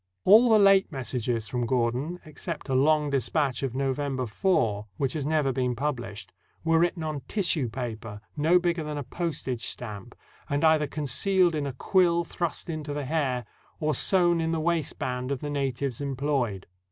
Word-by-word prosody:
All 225 +5 +7
the 220 - +6
late 195 -2 +5
messages 120 -4 -2
from 120 +2 -2
Gordon, 130 +8 0
except 150 -1 -6
a - - 0
long 150 +2 +3
dis 135 -3 0
patch 140 -6 0
of 130 -3 -3
November 135 -1 -1
4, 110 - 0
which 135 -2 0
has 145 -3 -2
never 150 -3 +2
been 125 -1 0
published, 115 -8 -4 0.3
were 165 0 +3
written 170 0 +1
on 155 -3 -3
tissue 170 - 0
paper 110 -3 -6 0.2
no 160 +4 +4
bigger 175 -2 0
than 150 -1 -4
a 145 - -3
postage 130 -4 -3
stamp, 105 -5 -7 0.3
and 145 +1 0
either 155 -2 +4
concealed 170 +6 +2
in 150 -2 -1
a 135 - -4
quill 170 +4 +2
thrust 170 +1 -3
into 155 -3 -4
the 145 -1 -3
hair, 130 -5 -1 0.3
or 155 -1 +1
sewn 175 +3 +3
in 165 - 0
the 165 - 0
waistband 140 -6 -1
of 140 - -1
the 145 - -4
natives 135 -2 -2
employed. 135 -7 -1
145 Hz, 175 wpm, -27 LUFS, 125-165 Hz, 0.3 s, All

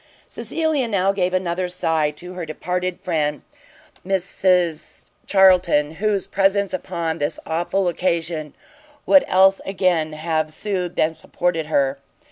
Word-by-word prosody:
Cecilia 315 -6 -1
now 195 -3 +1
gave 185 -2 0
another 180 0 -1
sigh 160 -4 0
to 175 +5 -10
her 180 -1 -5
departed 180 +3 -3
friend 150 -4 -1 0.6
Mrs 180 -3 0 0.2
Charlton, 180 -6 +4
whose 210 -3 +1
presence 195 0 +1
upon 170 -3 -3
this 145 - -2
awful 175 +4 -1
occasion 165 -3 -2 0.5
would 285 - +6
else 190 +1 +4
again 180 -5 0
have 155 0 -1
soothed 180 +1 -4
and 160 +1 +2
supported 165 0 -2
her. 140 -2 +1
180 Hz, 120 wpm, -21 LUFS, 160-190 Hz, 0.6 s, would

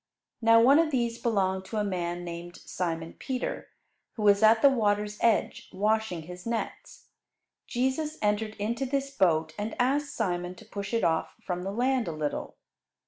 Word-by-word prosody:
Now 230 0 +6
one 270 +6 +6
of 330 -1 +3
these 235 -4 -1
belonged 190 -4 0
to 220 - -5
a 210 - +1
man 175 -3 -2
named 175 0 -7
Simon 165 -2 -3
Peter, 260 -2 -3 0.5
who 220 - -5
was 205 0 +5
at 220 +1 +5
the 280 - +9
water's 210 -3 0
edge 230 -3 +1
washing 210 -3 0
his 180 +2 -10
nets. 230 -1 -5 0.6
Jesus 265 +5 -1
entered 215 +1 0
into 230 +6 -2
this 275 +1 -1
boat 160 - +2
and 215 +2 -3
asked 280 +4 +1
Simon 180 -4 -2
to - - -14
push 200 -1 -6
it 230 -1 0
off 160 -1 0
from 180 -1 -2
the 190 +2 -3
land 250 +3 +1
a - - -1
little. 150 -1 -4
210 Hz, 170 wpm, -28 LUFS, 180-235 Hz, 0.6 s, the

